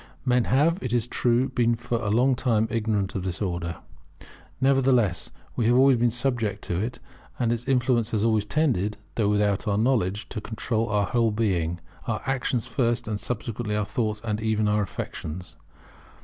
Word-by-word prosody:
Men 125 -2 +3
have, 155 +7 +2
it 125 -2 -3
is 120 -2 +2
true, 120 +1 +1
been 120 -1 +2
for 120 0 -2
a 105 - -1
long 125 +5 +3
time 115 -3 +1
ignorant 105 -4 0
of 95 - -2
this 90 -1 -3
Order. 85 -4 -2 0.8
Nevertheless 130 -8 +2 0.3
we 120 - 0
have 120 - +4
been - - +5
always 120 -3 +4
subject 120 -5 -1
to 85 - -2
it; 115 +5 -3 0.4
and 120 -1 +1
its 120 +2 -5
influence 125 -3 +2
has 110 -3 0
always 110 -2 +2
tended, 105 - +1 0.2
though 105 -3 +1
without 105 +1 +1
our 100 -1 +1
knowledge, 105 -4 +1
to 105 - -5
control 110 +1 -2
our 105 -1 +2
whole 115 0 +2
being; 90 -6 0 0.3
our 110 -2 -2
actions 130 -3 -1
first, 120 -3 0
and 105 -2 -2
subsequently 110 0 -3
our 105 -1 0
thoughts, 105 +1 -2
and 110 -2 -2
even 110 -1 +1
our 105 0 +2
affections. 90 -3 -6
115 Hz, 175 wpm, -26 LUFS, 105-125 Hz, 0.8 s, been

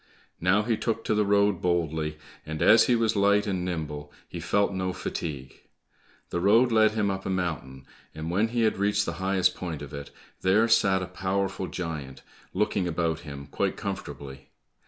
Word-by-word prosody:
Now 95 +4 +3
he 115 0 0
took 115 0 -2
to - - 0
the 105 -1 +2
road 100 -2 +3
boldly, 80 -3 0 0.3
and 80 0 -3
as 110 +1 +7
he 125 - +4
was 115 -1 +1
light 100 +1 +3
and 95 -4 -1
nimble, 75 -4 -4 0.2
he - - -7
felt 100 -1 +1
no 95 -1 -2
fatigue. 70 -7 -5 0.7
The 85 - -1
road 115 +7 +4
led 110 -1 +4
him 105 -2 +1
up 95 0 -4
a - - -4
mountain, 75 -8 -3 0.3
and 80 +2 -4
when 105 +5 +2
he 120 0 0
had 110 -3 +1
reached 100 0 +2
the - - -3
highest 95 -1 +2
point 80 -5 -5
of 70 - -10
it, 70 0 -7 0.3
there 105 +5 +4
sat 95 -5 +3
a - - -5
powerful 95 +1 -2
giant 75 -8 -6 0.3
looking 100 -1 0
about 80 -1 -1
him 70 -4 -8
quite 70 - -2
comfortably. 65 -1 -6
95 Hz, 180 wpm, -27 LUFS, 80-105 Hz, 0.7 s, as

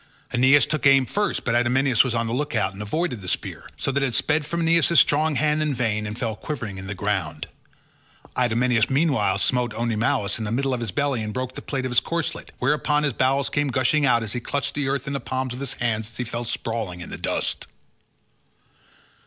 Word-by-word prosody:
Aeneas 130 +3 +5
took 155 -2 +1
aim 135 -1 +6
first, 205 +9 -1
but 115 - 0
Idomeneus 120 0 +3
was 125 -3 -2
on 115 0 0
the 115 - -3
look 145 +1 -2
out 95 -3 +1
and 100 - -8
avoided 125 - -2
the 90 - -9
spear, - - -4
so - - -1
that 140 +1 0
it 130 -4 0
sped 150 -1 +1
from 170 +2 -2
Aeneas' 165 0 +4
strong 155 +1 +3
hand 150 +2 +2
in 150 -3 0
vain, 110 -3 -1
and 105 +1 -6
fell 115 -3 -2
quivering 105 -4 -5
in 95 - -8
the 100 - -4
ground. 95 -6 -2 0.9
Idomeneus 120 -1 +2
meanwhile 135 - +2
smote 120 0 0
Oenomaus 110 -3 0
in - - -3
the 105 - -3
middle 135 +3 0
of 125 - -1
his 115 -2 -3
belly, 135 +4 0
and 105 0 -3
broke 130 0 -3
the - - -6
plate 135 -2 -3
of 130 - -3
his 125 - +5
corslet, 170 -1 -3
whereon 150 +2 +1
his 145 -3 0
bowels 135 +4 +1
came 145 0 +1
gushing 135 +3 +2
out 120 -4 +3
and 110 - -4
he 125 - -1
clutched 140 +3 -2
the 145 -2 -1
earth 140 0 -1
in 140 - -4
the 140 - -1
palms 130 -1 -3
of 125 - -7
his 140 -2 -3
hands 110 -2 -1
as 115 - -11
he 125 - -1
fell 120 0 -4
sprawling 110 -6 -3
in - - -8
the - - -4
dust. - - -2
125 Hz, 225 wpm, -24 LUFS, 110-140 Hz, 0.9 s, aim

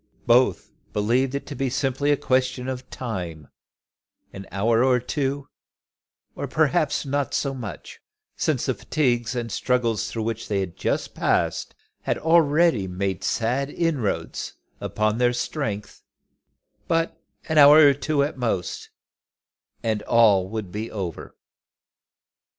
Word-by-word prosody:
Both 120 -5 +3 0.2
believed 120 +6 +1
it 140 - -4
to 145 - -7
be 135 0 -1
simply 135 +2 0
a 145 - +4
question 130 -1 0
of 130 -1 -5
time; 90 - -6 0.8
an 95 0 -9
hour 115 +4 +2
or 130 -1 +4
two, 140 +2 -2 1.0
perhaps - - +1
not 140 0 -1
so 140 -1 -1
much, 120 -6 -8 0.4
since - - 0
the - - +1
fatigues 120 -5 0
and 120 -2 -3
struggles 120 -1 0
through 115 - -3
which 115 0 -3
they 100 -2 0
had 95 -3 -4
just - - -2
passed - - 0 0.3
had - - -1
already 160 - +3
made 95 +1 -3
sad 125 +7 0
inroads 150 - -2 0.3
upon 110 +1 -1
their 125 0 +3
strength, 110 -5 -4 0.9
but 165 0 0 0.3
an 160 -1 +3
hour 150 +2 +9
or 140 - +6
two 145 +1 0
at 140 -2 -4
most, 110 -8 -2 0.9
and 110 -2 0
all 105 -6 +4
would 105 -4 -5
be 110 +3 -4
over. 95 -6 -6
125 Hz, 130 wpm, -24 LUFS, 105-140 Hz, 1.0 s, hour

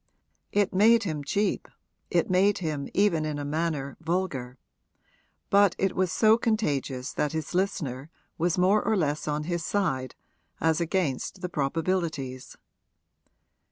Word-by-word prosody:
It 205 -1 +1
made 225 +4 +5
him 155 -6 -3
cheap, 205 +8 -1 0.4
it 175 -2 +2
made 190 +2 +3
him 155 -5 -3
even 190 -6 +2
in 155 -1 -2
a 145 - -4
manner 150 -2 -2
vulgar; 160 -7 -2 0.9
but 200 -2 +5
it 195 -1 0
was 185 -2 +1
so 220 +5 +4
contagious 145 - -1
that 150 0 -1
his 160 +1 -4
listener 150 -7 -2 0.3
was 170 +1 0
more 190 +4 +4
or 220 - +1
less 150 -3 -1
on 150 0 -1
his 170 +1 -2
side 145 -9 -1 0.4
as 160 +1 +2
against 170 0 -1
the 180 - -3
probabilities. 155 -3 -2
165 Hz, 135 wpm, -27 LUFS, 145-190 Hz, 0.9 s, made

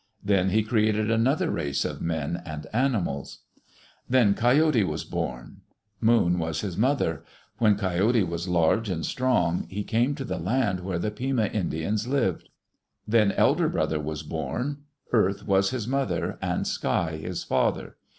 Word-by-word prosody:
Then 100 -2 +2
he 110 +3 +2
created 110 0 +1
another 135 +10 +2
race 70 -4 -1
of - - -4
men 85 +1 -2
and 75 -3 -7
animals. 110 - -1 0.7
Then 120 -6 +4
Coyote 125 +2 +3
was - - -3
born. 65 -1 -5 0.4
Moon 110 -7 +3
was 80 -1 -2
his 95 -5 -4
mother. 105 - +1 0.4
When 105 -3 +4
Coyote 100 +4 +2
was 85 0 -4
large 90 +5 +2
and 85 -3 -2
strong 90 -10 0
he 105 +2 -4
came 120 +7 +1
to 135 - -5
the - - -3
land 100 +1 0
where 90 -1 -3
the 95 +5 -2
Pima 125 0 0
Indians 100 +2 -2
lived. 125 - -1 0.6
Then 105 -2 +4
Elder - - +3
Brother 80 - 0
was 75 0 -4
born. 125 - -4 0.3
Earth 100 -4 +1
was 95 0 +3
his 125 -4 -3
mother, 135 +1 -1
and - - -1
Sky 80 -2 -1
his 90 +3 -5
father. - - 0
100 Hz, 150 wpm, -26 LUFS, 85-120 Hz, 0.7 s, Then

